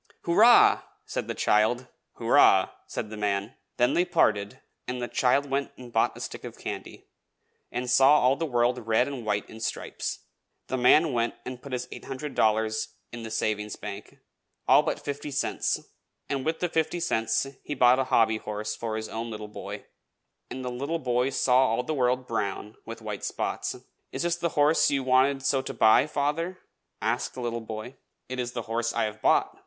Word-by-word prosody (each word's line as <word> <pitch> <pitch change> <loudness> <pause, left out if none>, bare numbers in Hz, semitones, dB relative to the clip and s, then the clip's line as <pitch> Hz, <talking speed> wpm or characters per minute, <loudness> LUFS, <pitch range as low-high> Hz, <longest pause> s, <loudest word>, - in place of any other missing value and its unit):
"Hurrah!" 220 +8 +6 0.2
said - - -4
the - - -3
child. 110 +4 +2 0.3
"Hurrah!" - - +5 0.2
said 105 - -5
the 110 - -6
man. 100 +2 -1 0.2
Then 120 0 +3
they 175 - +3
parted, 110 - +1 0.3
and 125 0 -3
the 120 - -3
child 130 +4 +2
went 140 +1 -2
and 120 -2 -11
bought 115 - +2
a - - -9
stick - - -6
of - - -8
candy, - - -7 0.7
and 125 +1 -3
saw 135 +4 +6
all 130 +2 +4
the 165 +3 -2
world 120 -2 0
red 115 +3 +3
and 135 -4 -5
white 105 -1 0
in 110 - -11
stripes. 110 - -4 0.4
The - - -3
man 150 +4 +5
went 120 -1 0
and 125 -1 -7
put 140 - -10
his 125 -1 -3
eight - - -9
hundred 135 +2 -5
dollars 110 0 +1 0.2
in 120 - -7
the 115 - -6
savings 105 -1 -2
bank, - - -8 0.5
all - - +7
but - - -2
fifty 145 +1 -5
cents, 140 - -1 0.5
and 135 -2 -2
with 160 +1 -1
the 180 - 0
fifty 160 +2 0
cents 115 -7 0 0.2
he 145 - -4
bought 125 0 +5
a 135 - +1
hobby 110 -3 +3
horse 105 0 -4
for 115 -2 -4
his 110 0 -4
own 115 +1 -5
little 105 -1 -6
boy, 105 - -8 0.6
and 130 0 -6
the 125 - -3
little 140 +7 -2
boy 125 -3 0
saw 130 -1 +3
all 115 +2 0
the 155 - -3
world 130 -2 +1
brown, 105 -2 -3
with 115 0 -8
white 105 -2 -5
spots. - - -2 0.4
"Is - - -3
this 170 0 +1
the 170 0 -1
horse 150 +2 +4
you 135 -1 0
wanted 130 +1 +3
so 135 0 +2
to - - -7
buy, 110 +6 +5
father?" 155 +5 -1 0.5
asked - - -1
the 130 - -6
little 115 -1 -2
boy. 110 +4 -7 0.3
"It 130 0 -5
is 120 0 -3
the 120 - -4
horse 115 +1 -2
I - - 0
have 110 0 -4
bought!" - - +2
125 Hz, 195 wpm, -27 LUFS, 110-140 Hz, 0.7 s, all